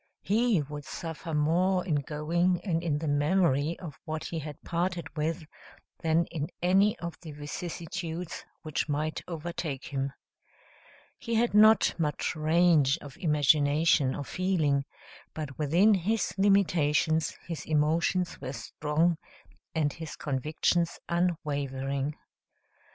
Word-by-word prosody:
He 215 -5 +2
would 145 +1 -7
suffer 165 +2 -6
more 180 +5 +2
in 170 - 0
going, 165 +5 0
and 165 -4 0
in 160 -4 0
the 155 +1 -3
memory 150 0 +2
of 160 -6 -9
what 155 -2 -4
he 165 - -3
had 150 -1 -7
parted 170 -1 -2
with, 160 +2 -2 0.6
than 165 0 +2
in 155 -3 -2
any 195 +4 +3
of 170 -1 -6
the 160 -4 -8
vicissitudes 165 +3 -5 0.2
which 155 -1 -2
might 155 +2 -1
overtake 165 -4 -4
him. 135 -1 -2 1.1
He 230 -1 -2
had 235 0 +2
not 215 +1 +6
much 150 0 -1
range 155 -2 +4
of 145 -4 -11
imagination 150 -2 +3
or 145 - -4
feeling, 155 -5 0 0.5
but 150 -4 -5
within 170 +9 +4
his 205 +4 0
limitations 165 -6 +2
his 165 -3 -4
emotions 165 +4 +1
were 130 - -4
strong 155 +7 0 0.6
and 150 -3 +1
his 160 -2 -7
convictions 155 +4 0
unwavering. 145 -5 -1
160 Hz, 125 wpm, -29 LUFS, 150-175 Hz, 1.1 s, not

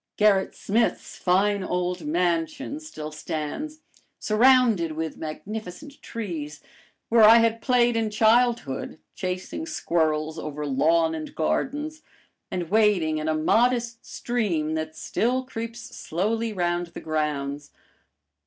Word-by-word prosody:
Gerrit 205 -2 +3
Smith's 225 +3 -1
fine 195 +2 +2
old 180 -2 -2
mansion 175 - -1
still 155 - -8
stands, 160 - -5 0.4
surrounded 225 -7 +4
with 160 0 -4
magnificent 215 - -7
trees, 160 -10 -5 0.5
where 230 0 +5
I 220 +2 +9
had 230 0 +2
played 240 -2 +3
in 225 -1 0
childhood, 220 - +2 0.2
chasing 185 - -4
squirrels 160 - 0
over 150 0 -5
lawn 160 +4 +2
and 155 -1 -6
gardens 295 - -1 0.5
and 175 -2 -4
wading 200 -8 +3
in 155 - -3
a 155 - +1
modest 235 +8 +1
stream 180 -11 -1
that 155 0 -4
still 255 +3 0
creeps 230 -2 -7
slowly 220 +7 -1
round 175 -2 -1
the 170 - -9
grounds. 145 -2 -2
185 Hz, 115 wpm, -25 LUFS, 160-230 Hz, 0.5 s, I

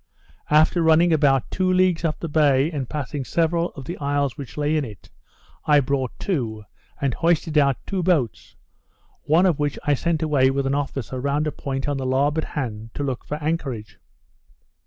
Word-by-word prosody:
After 155 +3 +4
running 165 +1 +4
about 140 -4 +2
two 185 -1 +1
leagues 185 -2 +2
up 160 -2 -1
the 170 - -4
bay, 145 -1 +3
and 140 -6 -4
passing 145 -1 -4
several 170 +4 0
of 135 - -9
the 175 - -6
isles 140 -2 0
which 140 -4 -9
lay 150 +1 +1
in 155 - +1
it, 105 -6 -11 0.6
I 150 -1 +6
brought 135 -2 -1
to, 115 - -2 0.4
and 135 -3 0
hoisted 165 0 +1
out 140 -4 +4
two 195 -2 -2
boats; 160 - 0 0.7
one 160 +5 +3
of 175 -6 +2
which 145 -1 -1
I 145 - +2
sent 165 +3 0
away 140 -4 +3
with 135 0 -1
an 135 - 0
officer 135 -3 -3
round 140 +2 0
a 150 - -1
point 135 -1 -4
on 145 -1 -1
the 135 - -3
larboard 145 +4 +1
hand 115 -5 -5
to 145 - -3
look 130 -3 -3
for 150 - -4
anchorage. 135 -9 -3
145 Hz, 185 wpm, -23 LUFS, 135-160 Hz, 0.7 s, I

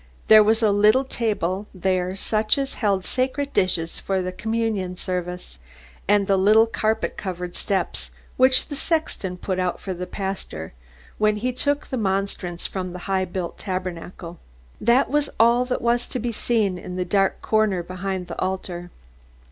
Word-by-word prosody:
There 215 -1 +9
was 220 +2 +2
a 215 - +5
little 210 +6 +5
table 205 -6 -1
there 185 0 0
such 215 +3 +1
as 275 -1 -1
held 200 -4 +2
the - - -7
sacred 275 +2 -1
dishes 170 -3 +1
for 190 -1 -1
the 185 - -3
communion 215 -3 -2
service, 180 - -4 0.5
and 205 0 +4
the 195 0 +3
little 215 +4 +6
carpet 220 -1 -1
covered 180 -3 -5
steps 195 -2 -2 0.3
which 260 +2 +4
the 290 - -4
sexton 280 - -1
put 185 0 -2
out 180 -1 -1
for 190 - -4
the 180 0 -5
pastor 190 - -5 0.5
when 215 0 +3
he 250 +4 -1
took 285 +3 0
the 260 - -4
monstrance 190 -4 -2
from 185 -2 -3
the 180 - -6
high 190 -1 +1
built 175 -1 -5
tabernacle. 180 -2 -5 0.4
That 240 +4 +4
was 295 -1 +1
all 235 +2 +5
that 250 - -2
was 240 +1 +2
to - - -4
be 240 0 -2
seen 210 -5 0
in 180 0 -7
the 180 0 -1
dark 195 +1 +2
corner 215 -5 +2
behind 185 +1 -4
the - - -7
altar. 180 -2 -3
195 Hz, 170 wpm, -23 LUFS, 185-225 Hz, 0.5 s, There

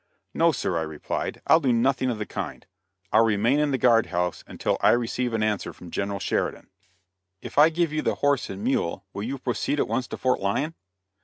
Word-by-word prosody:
"No, 165 0 +4
sir;" 90 - -1
I - - -2
replied, 80 -2 -4
"I'll 160 - +6
do 135 -6 +1
nothing 130 +2 +2
of 120 - -2
the 105 - -3
kind. - - -6 0.5
I'll 110 - +6
remain 115 +5 +2
in 150 -1 +2
the 135 - +1
guard 115 -2 +4
house 90 -1 -2
until - - -1
I - - +5
receive 120 +1 -1
an 110 - 0
answer 105 -2 -1
from 85 - -12
General 100 0 -2
Sheridan." - - -2 0.7
"If - - -2
I 155 +2 +8
give 165 -1 0
you 155 - 0
the - - 0
horse 145 -2 +1
and 95 +1 -6
mule 110 -7 -1
will 100 - -5
you 130 +6 -3
proceed 130 +3 -2
at - - +1
once 130 -1 -1
to - - -6
Fort 130 -1 +1
Lyon?" 135 +11 -1
120 Hz, 215 wpm, -25 LUFS, 100-140 Hz, 0.7 s, I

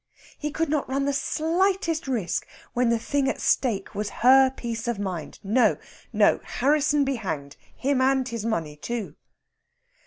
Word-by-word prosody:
He 300 - -2
could 320 +2 -1
not 295 -2 -1
run 275 +1 0
the 280 - 0
slightest 335 +3 0
risk 190 -10 -1 0.3
when 245 -1 +2
the 235 - +3
thing 270 +4 0
at - - -3
stake 215 -7 0
was 210 0 -3 0.2
her 265 +1 +8
peace 235 -3 -5
of 235 -3 -1
mind. 185 -6 -5
No, 220 +6 +3 0.3
no - - +4
Harrisson 290 +1 +2
be 270 -1 -1
hanged! 155 -9 -5 0.2
Him 270 0 0
and 265 -1 +2
his 230 -3 -4
money, 165 -10 -2
too. 225 +7 -5
255 Hz, 160 wpm, -25 LUFS, 215-280 Hz, 0.3 s, her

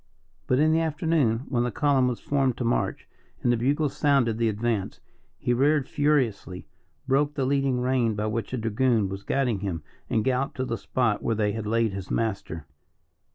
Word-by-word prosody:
But 125 - +2
in 155 +3 +4
the 160 - +3
afternoon, 155 -7 +1
when 120 -3 0
the 120 - 0
column 135 -1 +2
was 125 -2 -2
formed 135 -4 0
to - - -2
march, 115 - -1 0.4
and 120 - +3
the - - +1
bugles 140 +5 0
sounded 135 -6 +2
the 115 -1 +2
advance, 110 -1 -2 0.4
he 120 - 0
reared 140 +2 +2
furiously, 130 -11 0 0.4
broke 145 +2 +2
the 135 - 0
leading 135 -2 +1
rein 125 -3 +1
by 105 +1 -2
which 110 +1 -3
a 130 - -2
dragoon 115 -2 +1
was 95 +1 -5
guiding 125 -3 0
him, 90 -6 -4 0.3
and 110 - +1
galloped 130 +1 0
to 130 - -1
the 115 - -2
spot 115 -5 0
where 115 - 0
they 105 -1 +1
had 110 0 -4
laid 115 -1 +1
his 95 -1 -6
master. 95 -8 -2
120 Hz, 190 wpm, -26 LUFS, 110-135 Hz, 0.4 s, in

